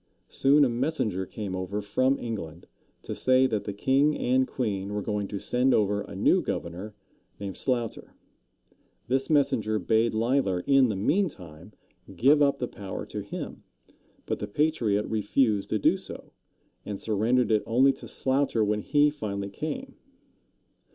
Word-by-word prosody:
Soon 140 +2 +4
a - - +1
messenger 115 - -1
came 100 -3 -5
over 95 +2 -3
from 130 +7 +1
England, 90 -8 -6 0.4
to - - -5
say 130 0 +3
that 110 -5 -1
the 105 - -3
king 135 +8 +2
and 130 +1 +2
queen 105 -5 -3
were 105 - -1
going 105 -1 -2
to 100 - -5
send 125 +6 +1
over 105 -1 +1
a - - -9
new - - +3
governor, 90 +5 -5 0.4
named 100 -2 -5
Sloughter. 120 -4 -3 0.9
This 135 +1 0
messenger 135 -8 +2
bade 110 +4 +1
Leisler, 115 -5 +1
in 135 +2 +4
the 105 - -1
meantime, 100 - -2 0.4
give 145 +3 +4
up 140 -1 +3
the 125 - -3
power 100 -5 -7
to - - -6
him; - - -7 0.6
but - - -3
the 105 - -4
patriot 110 -5 +1
refused 110 0 +1
to - - +1
do - - +3
so, - - -11 0.5
and 100 -1 -5
surrendered 115 +3 +1
it 105 -1 +3
only 130 +4 +4
to - - -12
Sloughter 130 -4 0
when 105 0 0
he 145 +5 +3
finally 100 -8 -5
came. 255 - -5
110 Hz, 155 wpm, -27 LUFS, 100-135 Hz, 0.9 s, Soon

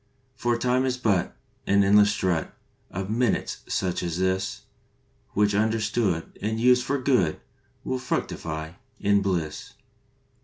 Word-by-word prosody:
For 120 -2 0
Time 125 +2 +1
is 130 -1 -1
but 105 -8 0 0.3
An 100 0 +4
endless 105 +1 +6
strut 90 -5 -1 0.4
Of 95 +2 -4
minutes 120 -1 0
such 90 -2 -1
as 85 -2 -3
this, 95 +1 -1 0.7
Which, 105 0 +2
understood 110 -4 0
And 110 +2 -1
used 125 +1 +5
for 140 - 0
good, 125 - +1 0.4
Will 130 0 -2
fructify 80 -10 -3 0.3
in 100 0 +3
bliss. 85 -6 -2
100 Hz, 125 wpm, -26 LUFS, 95-120 Hz, 0.7 s, endless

